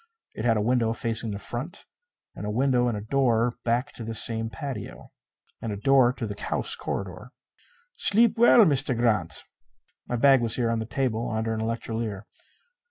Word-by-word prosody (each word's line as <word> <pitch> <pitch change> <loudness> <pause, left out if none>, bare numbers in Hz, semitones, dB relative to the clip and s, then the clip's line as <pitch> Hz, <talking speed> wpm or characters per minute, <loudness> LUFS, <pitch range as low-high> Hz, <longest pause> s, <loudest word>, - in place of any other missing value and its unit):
It 110 - -5
had 115 -2 +3
a - - 0
window 115 -1 +1
facing 115 0 0
the 100 - -4
front; 120 - -7 0.5
and - - -9
a 105 - -3
window 125 +2 +1
and 105 -3 -4
door 120 -3 +1
back 120 +5 0
to 115 - -7
this 115 -1 +2
same 115 -1 0
patio. 140 +1 -7 0.5
And 115 - -4
a 100 - -4
door 130 +3 +4
to 125 - -5
the 105 -1 -7
house - - -1
corridor. 100 +7 -6 0.6
"Sleep 225 +2 +4
well, 235 -1 +6
Meester 140 -4 +1
Grant." 110 -8 0 0.6
My 120 - -2
bag 135 +1 +5
was 115 -1 0
here 120 -2 0
on 115 - -1
the 110 - -5
table 120 -2 -2
under 110 0 -2
an 110 - -3
electrolier. 115 -2 -4
115 Hz, 175 wpm, -25 LUFS, 110-130 Hz, 0.6 s, well